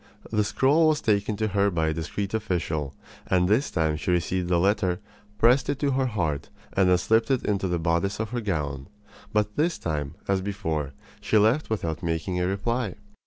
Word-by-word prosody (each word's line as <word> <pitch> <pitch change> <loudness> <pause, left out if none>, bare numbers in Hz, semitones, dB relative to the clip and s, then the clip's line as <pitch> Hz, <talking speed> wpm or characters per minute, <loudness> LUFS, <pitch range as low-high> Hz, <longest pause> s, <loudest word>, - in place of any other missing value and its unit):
The 105 -1 +2
scrawl 145 +9 +3
was 155 -1 +3
taken 105 -2 +1
to 110 0 0
her 100 +1 +2
by 80 -4 0
a - - 0
discreet 95 +6 -4
official, 85 -9 -2 0.3
and 90 -1 +3
this 115 +9 +2
time 80 -3 0
she 75 - -4
received 90 +1 0
the 90 - +3
letter, 95 -1 +1 0.4
pressed 125 +4 +4
it 145 - 0
to 140 0 0
her 130 0 +1
heart, 80 - -2 0.2
and 95 -2 +3
then 90 - +5
slipped 110 +5 +2
it 130 -2 +1
into 100 -2 0
the 90 -1 0
bodice 85 +5 0
of 110 0 -3
her 120 -1 -2
gown. 75 -9 -3 0.4
But 105 -1 0
this 165 +3 +1
time, 75 -4 -3
as 95 -1 +1
before, 80 -8 -3 0.3
she 110 - +2
left 110 +9 +3
without 85 -8 -2
making 85 +2 -2
a 90 - +1
reply. 105 +2 -1
100 Hz, 195 wpm, -26 LUFS, 85-110 Hz, 0.4 s, then